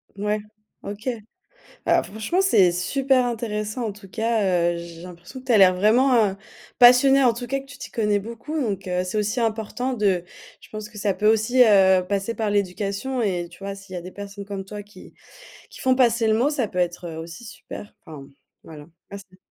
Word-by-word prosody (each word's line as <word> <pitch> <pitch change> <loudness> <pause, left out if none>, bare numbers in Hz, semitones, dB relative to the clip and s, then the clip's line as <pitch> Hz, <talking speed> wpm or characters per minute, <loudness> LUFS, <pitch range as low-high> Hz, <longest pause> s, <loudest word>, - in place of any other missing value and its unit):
Ouais, 210 +1 -1 0.4
OK. 205 +4 -7 0.6
Heu, - - 0
franchement 220 - -2
c'est 195 - +5
super 255 +8 +1
intéressant 225 0 -3
en 210 - -3
tout 200 -1 -14
cas, 195 -6 +1
heu, - - -4
j'ai 170 -1 -9
l'impression 180 +8 -11
que 260 - -19
tu 245 - +1
as - - +6
l'air 185 -2 +7
vraiment 220 +1 +3 0.4
passionnée, 260 +2 +7
en 240 - +5
tout 240 +1 -6
cas 275 +2 -2
que - - -13
tu 275 +1 -13
t'y - - -8
connais 210 -2 +1
beaucoup 235 +9 -6
donc 200 -7 -3
heu, 180 0 -1
c'est 185 +3 -4
aussi 210 +3 0
important 225 +3 -2
de 200 -6 +1 0.4
je - - -17
pense 215 0 -8
que 210 - -11
ça 200 -1 0
peut 210 +2 +1
aussi, 230 +4 +3
heu, 190 -4 +5
passer 200 +3 -2
par 220 -2 -1
l'éducation 205 +6 -1
et 180 -5 -1
tu 170 - -17
vois, 200 0 -4
s'il 195 -1 -12
y - - -3
a 175 - -8
des 185 - -9
personnes 200 0 -8
comme 200 -1 -6
toi 205 +1 -7
qui 205 +1 -16 0.6
qui - - -13
font 260 0 +3
passer 235 -3 +3
le 220 - +3
mot, 245 +7 +2
ça 265 -7 -1
peut 180 - -4
être 175 -1 -2
aussi 165 +7 -9
super. 210 -2 -10
Enfin 155 -3 -10
m 135 - -17 0.3
voilà. 150 -2 -11 0.3
Merci. 195 -2 -11
210 Hz, 210 wpm, -23 LUFS, 190-235 Hz, 0.6 s, l'air